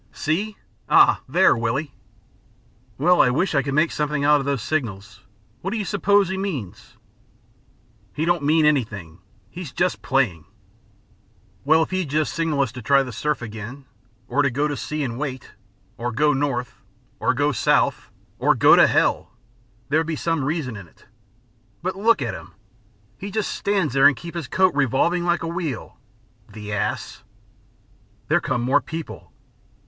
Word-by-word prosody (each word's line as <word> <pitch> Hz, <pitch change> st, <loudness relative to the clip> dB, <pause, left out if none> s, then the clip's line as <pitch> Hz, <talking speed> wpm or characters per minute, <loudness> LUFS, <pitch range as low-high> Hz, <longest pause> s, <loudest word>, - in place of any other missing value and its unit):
See? 200 Hz, +7 st, -2 dB, 0.3 s
Ah, -, -, +5 dB
there, 180 Hz, +7 st, +4 dB
Willie!" 125 Hz, +5 st, -2 dB, 1.0 s
"Well, 175 Hz, +5 st, +4 dB
I 125 Hz, -, +4 dB
wish 160 Hz, +10 st, 0 dB
I 140 Hz, -, +3 dB
could 135 Hz, +1 st, -3 dB
make 155 Hz, +2 st, +3 dB
something 150 Hz, -1 st, -1 dB
out 150 Hz, 0 st, +5 dB
of 140 Hz, -, -4 dB
those 140 Hz, -6 st, -1 dB
signals. 115 Hz, -8 st, -4 dB, 0.4 s
What 190 Hz, -, -3 dB
do 225 Hz, -, -3 dB
you 210 Hz, -, -2 dB
suppose 200 Hz, 0 st, +2 dB
he 190 Hz, 0 st, -3 dB
means?" 145 Hz, -, -6 dB, 1.1 s
"He 155 Hz, -, -2 dB
don't 175 Hz, -1 st, +1 dB
mean 155 Hz, +2 st, +3 dB
anything. 105 Hz, -, -1 dB, 0.3 s
He's 175 Hz, -6 st, -7 dB
just 180 Hz, +5 st, -1 dB
playing." 120 Hz, -12 st, 0 dB, 1.2 s
"Well, 160 Hz, +3 st, +4 dB
if -, -, -7 dB
he'd 185 Hz, -5 st, -2 dB
just 155 Hz, +2 st, 0 dB
signal 160 Hz, -4 st, 0 dB
us 135 Hz, -4 st, 0 dB
to 125 Hz, 0 st, -9 dB
try 135 Hz, +4 st, +3 dB
the 125 Hz, -, -7 dB
surf 145 Hz, +3 st, -2 dB
again, 115 Hz, +5 st, -8 dB, 0.4 s
or 140 Hz, +4 st, +1 dB
to 140 Hz, -, +2 dB
go 145 Hz, +4 st, 0 dB
to 145 Hz, -, -3 dB
sea 150 Hz, +2 st, -4 dB
and 120 Hz, -2 st, -4 dB
wait, 130 Hz, -4 st, -5 dB, 0.5 s
or 120 Hz, +1 st, -2 dB
go 150 Hz, +5 st, +2 dB
north, 125 Hz, -4 st, -2 dB, 0.4 s
or -, -, +1 dB
go -, -, +1 dB
south, -, -, +1 dB, 0.3 s
or -, -, +3 dB
go -, -, +6 dB
to -, -, +6 dB
hell -, -, +1 dB, 0.6 s
there 155 Hz, +3 st, +3 dB
would 160 Hz, -, -2 dB
be 165 Hz, -, -2 dB
some 165 Hz, -2 st, -1 dB
reason 140 Hz, -4 st, -2 dB
in 100 Hz, -4 st, -10 dB
it. -, -, -24 dB, 0.8 s
But 185 Hz, +1 st, -2 dB
look 205 Hz, -, +2 dB
at 120 Hz, -, -3 dB
him. -, -, -11 dB, 0.6 s
He 200 Hz, -, -6 dB
just 210 Hz, 0 st, -2 dB
stands 195 Hz, -6 st, 0 dB
there 135 Hz, 0 st, +6 dB
and 145 Hz, -, +3 dB
keeps 170 Hz, 0 st, -9 dB
his 160 Hz, -7 st, -5 dB
coat 185 Hz, +4 st, +2 dB
revolving 145 Hz, +6 st, +1 dB
like 175 Hz, -1 st, +1 dB
a -, -, -2 dB
wheel. 165 Hz, -8 st, -5 dB, 0.5 s
The 105 Hz, -1 st, -7 dB
ass!" 100 Hz, -, -3 dB, 1.1 s
"There -, -, +3 dB
come 120 Hz, -, -1 dB
more 135 Hz, +4 st, +3 dB
people." 160 Hz, +3 st, -8 dB
145 Hz, 170 wpm, -22 LUFS, 125-170 Hz, 1.2 s, go